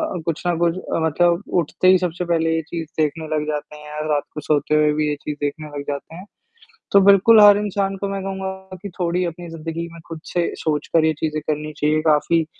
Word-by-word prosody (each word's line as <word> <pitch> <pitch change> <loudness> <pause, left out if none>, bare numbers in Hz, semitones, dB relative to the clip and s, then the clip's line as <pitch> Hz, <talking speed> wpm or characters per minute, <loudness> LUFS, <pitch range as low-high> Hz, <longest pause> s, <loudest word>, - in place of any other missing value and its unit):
अ, 170 - -4
कुछ 165 -2 -2
ना 175 - +2
कुछ 170 0 +1 0.3
मतलब 170 +2 +3
अ, - - -13
उठते 170 +3 0
ही 185 - +7
सबसे 180 0 -3
पहले 165 -1 +1
ये 165 - 0
चीज़ 165 -2 -5
देखने 155 +1 -1
लग 150 0 -1
जाते 150 0 -4
हैं 150 0 -12
या 150 0 -6
रात 145 -1 +1
को 150 - -5
सोते 150 0 +1
हुए 150 0 +4
भी 150 0 0
ये 145 - -1
चीज़ 150 -1 -4
देखने 150 +2 -3
लग 140 - -4
जाते 145 +3 -5
हैं, 185 - -10 0.7
तो 200 - +7
बिल्कुल 200 +3 +6
हर 205 -1 +9
इंसान 200 -1 -1
को 200 +1 -3
मैं 195 0 -3
कहूँगा 190 0 -6
कि 200 - -5
थोड़ी 175 +1 0
अपनी 175 0 -6
ज़िंदगी 165 +1 -5
में 165 - -11
खुद 165 -1 -7
से 175 -1 +1 0.2
सोचकर 155 +1 +1
ये 160 - +3
चीज़ें 155 -1 -1
करनी 155 0 -2
चाहिए, 150 +1 +2
काफ़ी 160 +1 +2
165 Hz, 230 wpm, -21 LUFS, 150-180 Hz, 0.7 s, हर